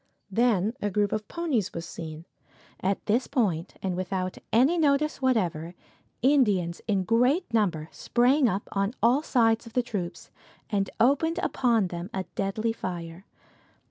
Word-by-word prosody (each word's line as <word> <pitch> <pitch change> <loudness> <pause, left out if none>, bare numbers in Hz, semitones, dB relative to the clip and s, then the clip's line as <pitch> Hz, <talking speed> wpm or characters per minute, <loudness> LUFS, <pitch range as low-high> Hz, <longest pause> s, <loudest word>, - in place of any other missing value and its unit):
Then 220 -1 +2
a 205 - 0
group 205 +1 +1
of 215 -1 -2
ponies 285 - -1
was 170 0 -4
seen. 160 -1 -8 0.5
At 195 +1 -1
this 230 +4 +1
point, 185 - -1
and 185 -2 -1
without 185 0 -3
any 270 +10 +4
notice 295 -1 +2
whatever, 180 -10 0 0.5
Indians 205 -11 +3
in 200 -3 +1
great 245 - +2
numbers 175 -8 +1
sprang 250 +2 +2
up 195 +1 -3
on 200 +4 -1
all 245 +5 +4
sides 230 -6 +2
of 225 - -12
the 250 - +2
troops, 195 -7 -5 0.4
and 200 -2 0
opened 285 +7 +3
upon 230 -7 +2
them 175 +2 -6
a 190 - -1
deadly 215 +3 -1
fire. 175 -3 -6
210 Hz, 145 wpm, -27 LUFS, 185-250 Hz, 0.5 s, any